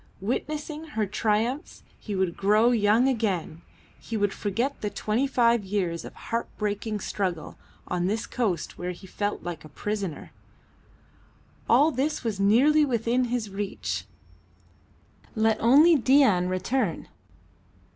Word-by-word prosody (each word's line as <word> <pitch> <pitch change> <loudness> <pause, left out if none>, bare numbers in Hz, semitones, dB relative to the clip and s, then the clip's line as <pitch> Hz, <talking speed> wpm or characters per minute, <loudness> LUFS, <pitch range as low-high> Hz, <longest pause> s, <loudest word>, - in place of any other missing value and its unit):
Witnessing 300 +8 -3
her 215 - +2
triumphs 220 - -1 0.2
he 210 - -5
would 185 -2 0
grow 215 +4 +3
young 225 +2 +3
again, 195 -10 -1 0.4
he 225 - -5
would 205 -1 +1
forget 235 +8 -2
the 210 - -1
twenty 215 +6 -1
five 235 -4 +3
years 185 -4 -2
of - - -10
heart 230 +1 -3
breaking 210 0 -2
struggle 185 -4 -3 0.3
on 180 0 -1
this 220 +4 -1
coast 200 -10 -2
where 180 0 -3
he 180 - -13
felt 205 +2 -3
like 175 -2 -6
a 155 - -12
prisoner. 200 +1 -4 1.4
All 285 +7 +5
this 290 +3 -1
was 220 -4 -2
nearly 260 +10 +5
within 245 -1 +1
his 235 -4 -3
reach. 195 0 -4 1.3
Let 220 0 +2
only 295 +9 +6
Dain 260 -9 +4
return! 185 +2 -1
215 Hz, 130 wpm, -26 LUFS, 195-245 Hz, 1.4 s, only